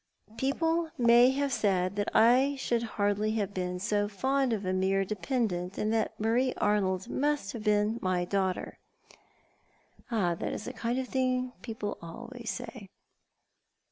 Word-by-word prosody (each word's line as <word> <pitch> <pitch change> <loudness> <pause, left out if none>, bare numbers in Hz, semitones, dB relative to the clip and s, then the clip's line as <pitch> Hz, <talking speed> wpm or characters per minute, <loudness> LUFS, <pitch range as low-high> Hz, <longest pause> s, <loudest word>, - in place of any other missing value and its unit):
" - - -48
People 325 +4 0
may 240 +1 +6
have 275 +1 0
said 190 -3 +1
that 205 0 -1
I 255 +5 +5
should 240 -3 0 0.2
hardly 205 +1 +1
have 205 -2 -2
been 180 -1 -2
so 205 +2 0
fond 265 +6 0
of 210 -3 -2
a 185 - 0
mere 190 +1 +1
dependent, 200 -4 -2
and 215 +1 0
that 220 -1 -1
Marie 240 +4 +1
Arnold 190 -3 +1
must 290 -7 -1
have 225 - -6
been 210 +2 +2
my 180 -1 0
daughter." 190 -1 -2 0.7
" - - -33
That 180 -8 0
is - - -3
the 250 - -5
kind 235 +1 -2
of 260 -1 -2
thing 255 -1 0
people 220 -3 -5
always 230 +7 -8
say." 230 -5 -6
220 Hz, 155 wpm, -29 LUFS, 195-255 Hz, 0.7 s, may